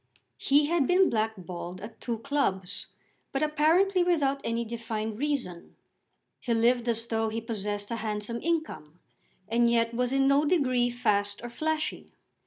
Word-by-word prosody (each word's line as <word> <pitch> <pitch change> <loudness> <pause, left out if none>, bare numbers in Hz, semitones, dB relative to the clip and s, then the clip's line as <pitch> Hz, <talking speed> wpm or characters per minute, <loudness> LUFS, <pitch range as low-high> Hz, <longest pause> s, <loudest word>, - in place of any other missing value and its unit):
He 290 +2 +4
had 315 -2 +1
been 365 +1 +4
blackballed 185 -5 -3
at 215 +3 -10
two 235 -2 -2
clubs, 215 -8 -1 0.4
but 270 +2 0
apparently 330 +6 +3
without 290 -6 +1
any 230 +1 -1
defined 225 -1 -4
reason. 265 -12 -3 0.6
He 235 -2 -1
lived 240 +1 +2
as 230 0 -1
though 225 -1 -1
he 225 +1 -3
possessed 210 -2 -4
a 230 - -1
handsome 215 +1 -3
income, 315 - -3 0.5
and 235 +2 +3
yet 230 0 +2
was 250 +1 0
in 270 0 +3
no 275 +2 +4
degree 260 -7 +2
fast 205 -4 0
or 240 - -5
flashy. 310 +5 -2
235 Hz, 150 wpm, -28 LUFS, 220-285 Hz, 0.6 s, He